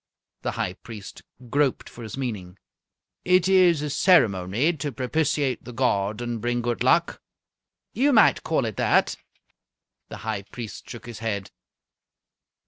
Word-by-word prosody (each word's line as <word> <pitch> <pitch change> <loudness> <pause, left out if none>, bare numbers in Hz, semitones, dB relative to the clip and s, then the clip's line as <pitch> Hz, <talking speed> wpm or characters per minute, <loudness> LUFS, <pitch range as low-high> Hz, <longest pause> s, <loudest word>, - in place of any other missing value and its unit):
The - - -2
High 90 - -1
Priest 105 0 -10 0.3
groped 145 -2 +1
for 120 - -12
his 110 +2 -7
meaning. 100 -8 -5 0.7
"It 180 0 +3
is 180 -5 +4
a 150 - -2
ceremony 120 - +3
to 145 0 -3
propitiate 140 +2 -1
the 125 - -9
god 110 -3 0
and 120 -2 -4
bring 120 +1 -1
good 120 -1 -2
luck?" - - +2 0.7
"You 275 +6 +3
might 220 -5 +5
call 155 -6 0
it 110 -3 -5
that." - - +2 0.9
The - - -7
High 110 -3 -2
Priest 110 +2 -9
shook 120 - -9
his 120 -3 -8
head. 105 -4 -3
120 Hz, 140 wpm, -25 LUFS, 110-150 Hz, 0.9 s, might